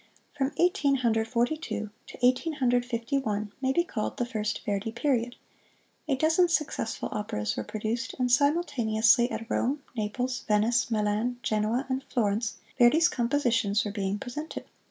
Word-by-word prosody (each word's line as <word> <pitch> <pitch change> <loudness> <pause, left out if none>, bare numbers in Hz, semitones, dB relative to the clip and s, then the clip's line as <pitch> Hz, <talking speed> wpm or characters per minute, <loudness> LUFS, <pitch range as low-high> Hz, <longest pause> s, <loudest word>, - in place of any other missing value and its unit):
From 275 -1 0
Eighteen 345 -6 +3
Hundred 225 -3 +1
Forty 240 +5 +1
two 215 -9 -5 0.2
to - - -10
Eighteen 255 +6 +2
Hundred 245 -4 +1
Fifty 240 +3 -1
one 210 -4 -2
may 265 0 +2
be 345 +5 +2
called 220 -10 -4
the 245 - 0
First 215 -3 -3
Verdi 205 +2 -1
Period. 245 -1 0 0.7
A 280 - +2
dozen 320 +5 +3
successful 300 -8 -1
operas 105 - -2
were 110 - -3
produced, 220 - -3
and 250 -2 0
simultaneously 245 -5 +3
at 225 - -4
Rome, 275 +5 -1
Naples, 245 +4 -2
Venice, 220 +4 +2
Milan, 215 +2 0
Genoa 220 +5 0
and 265 0 -2
Florence, 220 -1 0 0.2
Verdi's 310 +8 +6
compositions 235 -6 +1
were 205 - -3
being 200 -1 -2
presented. 275 +7 -6
240 Hz, 155 wpm, -28 LUFS, 215-275 Hz, 0.7 s, Verdi's